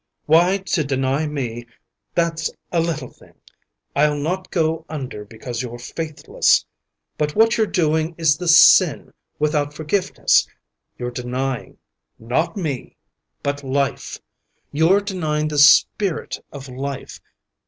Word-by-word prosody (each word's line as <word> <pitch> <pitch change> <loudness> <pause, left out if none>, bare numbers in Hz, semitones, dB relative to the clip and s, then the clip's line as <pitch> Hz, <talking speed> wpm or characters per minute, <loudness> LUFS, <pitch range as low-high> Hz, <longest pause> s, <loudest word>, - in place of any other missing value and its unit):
Why, 175 +5 +4
to 190 -4 -1
deny 135 +2 0
me, 120 -5 -5 0.5
that's 165 -2 0 0.2
a 170 - +1
little 160 -6 -2
thing. - - -21 0.6
I'll 150 +1 +3
not 185 +5 -3
go 160 -2 0
under 130 -9 -6
be 110 +2 -15
cause 120 +1 -5
you're 120 -1 -6
faithless. 155 +5 0 0.5
But 150 -1 -1
what 225 0 +4
you're 220 -1 +1
doing 160 -2 0
is 160 -3 +3
the 180 - -5
sin 160 -1 +6 0.2
without 150 -1 0
forgiveness. 185 +5 +1 0.5
You're 125 0 -4
denying 125 +1 -4 0.3
— - - -56 0.2
not 170 +9 0
me 150 -9 -4 0.2
— 60 0 -52
but 140 0 -2
life. 135 +1 -2 0.5
You're 165 +7 +3
denying 155 -6 -2
the 150 -1 -1
spirit 160 +4 +3
of 140 -1 -9
life. 135 +1 -6
150 Hz, 130 wpm, -21 LUFS, 135-165 Hz, 0.6 s, sin